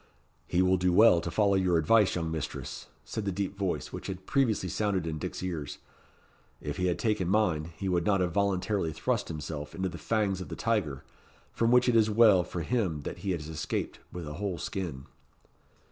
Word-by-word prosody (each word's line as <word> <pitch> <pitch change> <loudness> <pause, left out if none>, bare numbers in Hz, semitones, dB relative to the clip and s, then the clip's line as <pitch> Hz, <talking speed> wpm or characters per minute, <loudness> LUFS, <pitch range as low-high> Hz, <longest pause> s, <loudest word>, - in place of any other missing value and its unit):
"He 90 +1 +2
will 95 0 +3
do 90 0 +2
well 90 -2 +6
to 85 - -4
follow 100 +2 +2
your 95 -3 +3
advice, 105 +6 +4
young 80 -2 -2
mistress," 80 -3 -5 0.2
said 110 - -4
the 100 - -1
deep 100 +1 -3
voice 95 -3 -2
which - - -6
had 95 -1 -6
previously 120 -9 +1
sounded 95 -1 0
in 80 -1 -3
Dick's - - -5
ears; 85 -6 -4 0.8
"if - - -5
he 90 - +1
had 90 - 0
taken 105 -6 0
mine, 85 -6 +1
he 95 - -3
would 90 -2 +1
not 100 +1 +2
have 90 -1 +1
voluntarily 100 -2 0
thrust - - -1
himself 75 -1 -6
into 95 0 -1
the 85 -1 -8
fangs 100 0 0
of - - -7
the - - -5
tiger, 100 - -1 0.5
from 115 - +1
which 125 +1 +5
it 120 - +3
is 110 -1 +5
well 105 -4 +6
for 85 - -5
him 90 -7 -1
that - - -6
he 100 - -4
has 80 -5 -2
escaped 80 +1 -3
with 85 -3 -6
a 75 - -5
whole 100 -4 -2
skin." 85 -11 -4
95 Hz, 205 wpm, -29 LUFS, 85-105 Hz, 0.8 s, well